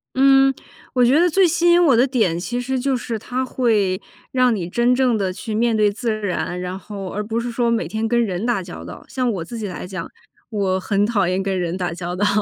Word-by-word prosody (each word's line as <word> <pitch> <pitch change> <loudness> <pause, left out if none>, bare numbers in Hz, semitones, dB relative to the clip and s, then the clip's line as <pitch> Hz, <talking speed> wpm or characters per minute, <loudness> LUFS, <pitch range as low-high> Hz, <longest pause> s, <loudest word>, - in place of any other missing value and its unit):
嗯， 270 0 +5 0.4
我 250 - +2
觉 260 +5 +4
得 355 +2 +4
最 380 +2 +4
吸 345 +1 +3
引 350 +1 +6
我 265 -6 +5
的 250 +3 +4
点， 220 -11 +1
其 240 +7 -3
实 260 +1 -2
就 270 +1 0
是 235 -2 -4
它 250 +4 -3
会 215 -7 +1 0.3
让 255 -2 +3
你 180 -5 -3
真 240 +6 +2
正 250 -3 +2
地 190 -3 -1
去 215 +3 -6
面 230 +1 +2
对 210 -1 +3
自 225 +3 -3
然， 180 -2 -2
然 180 +1 -4
后 195 -1 -7
而 210 +2 -4
不 225 +2 -2
是 240 +1 -3
说 235 0 0
每 230 -1 0
天 220 +1 -2
跟 235 +1 +2
人 195 -1 -2
打 235 -5 0
交 175 -1 -9
道。 - - -9
像 255 -2 -1
我 185 -5 -3
自 235 +6 -7
己 210 - -3
来 180 -1 -6
讲， 180 -3 -6 0.4
我 195 -3 0
很 200 +2 +1
讨 210 -4 +1
厌 185 +2 0
跟 190 -1 -1
人 175 +1 -2
打 175 -2 -2
交 175 0 -5
道， 205 +3 +1
220 Hz, 260 characters per minute, -21 LUFS, 190-250 Hz, 0.4 s, 引